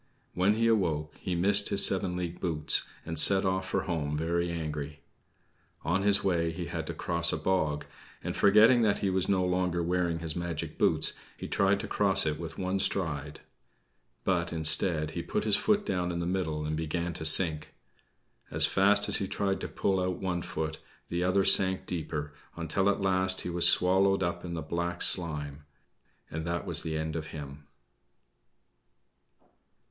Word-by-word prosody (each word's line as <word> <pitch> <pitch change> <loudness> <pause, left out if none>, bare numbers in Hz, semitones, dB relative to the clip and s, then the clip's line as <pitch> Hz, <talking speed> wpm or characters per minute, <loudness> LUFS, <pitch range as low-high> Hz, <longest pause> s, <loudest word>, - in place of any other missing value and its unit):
When 95 +4 +2
he 115 +1 0
awoke 85 -9 0
he 90 - -3
missed 100 +4 +4
his 100 - +5
seven 95 -2 +1
league 90 -1 -5
boots, 80 -4 +1 0.2
and 80 -1 -2
set 95 +3 +6
off 95 0 -1
for - - 0
home 75 -5 -3
very 85 +2 -1
angry. 75 -3 -5 0.8
On 95 +4 0
his 100 0 +3
way 85 -3 0
he 85 +1 -6
had 85 -2 -5
to - - -4
cross 85 0 +1
a - - -2
bog; 80 -3 -1 0.4
and, - - -4
forgetting 110 +5 +5
that 105 -3 +2
he 100 -2 -1
was 95 0 0
no 95 -2 +2
longer 90 -1 -1
wearing 85 -1 -1
his 80 -2 -5
magic 85 -3 -5
boots, - - +2 0.2
he - - -7
tried 100 0 +1
to 110 - -6
cross 100 -3 +2
it 75 -1 -2
with 80 -1 -7
one 95 +1 -2
stride. 75 -7 -2 0.8
But, 85 -3 0
instead, 80 0 +1
he 85 - -4
put - - -3
his 105 -2 +2
foot 210 -1 +1
down 90 - -2
in 85 - -4
the 85 - -2
middle 85 -4 -2
and 75 0 -2
began 85 +2 -3
to 80 - -6
sink. 80 -1 +2 0.7
As - - +4
fast 100 +1 +3
as - - +2
he 95 - -3
tried 95 0 -2
to - - -4
pull 95 -1 -1
out 90 -1 -2
one 90 -2 -3
foot, 80 -1 -5 0.3
the 85 +1 -2
other 95 +2 +2
sank 95 -1 +4
deeper, 75 -4 -5 0.2
until 95 +4 0
at 100 - -1
last 95 -1 +1
he 90 - -5
was 85 0 +6
swallowed 95 +1 +3
up 85 0 -3
in 85 -1 -5
the 80 - -5
black 85 +2 -3
slime 75 -4 -1 0.7
and 80 0 -4
that 85 0 -3
was - - -1
the 80 -1 -4
end 80 0 -4
of 80 -1 -4
him. 75 -2 -9
85 Hz, 180 wpm, -29 LUFS, 80-95 Hz, 0.8 s, set